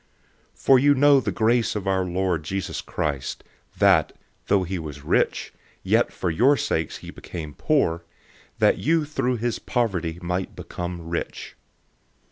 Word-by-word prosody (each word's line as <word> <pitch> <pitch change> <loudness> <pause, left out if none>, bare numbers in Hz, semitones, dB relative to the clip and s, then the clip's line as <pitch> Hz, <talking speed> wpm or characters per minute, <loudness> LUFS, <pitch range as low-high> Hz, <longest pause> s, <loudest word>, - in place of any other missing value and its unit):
008:009 - - -32
For 135 -1 +5
you 145 +2 +5
know 140 +1 +6
the - - -2
grace 115 +1 +1
of 100 -2 -4
our 95 -1 +2
Lord 90 -2 -1
Jesus 95 +4 -3
Christ, 70 -3 -3 0.3
that, - - +4 0.3
though 100 -2 +3
he 90 0 -3
was 75 -3 -8
rich, - - 0 0.3
yet - - +2
for 90 - -2
your 130 - +4
sakes 80 - -1
he - - -7
became 80 -4 -8
poor, 85 - +1 0.5
that - - +3
you 160 0 +2
through 130 -4 -1
his 120 +1 -2
poverty 90 -9 -1
might 90 +1 -3
become 85 -1 -6
rich. 85 0 -5
95 Hz, 150 wpm, -24 LUFS, 85-125 Hz, 0.5 s, know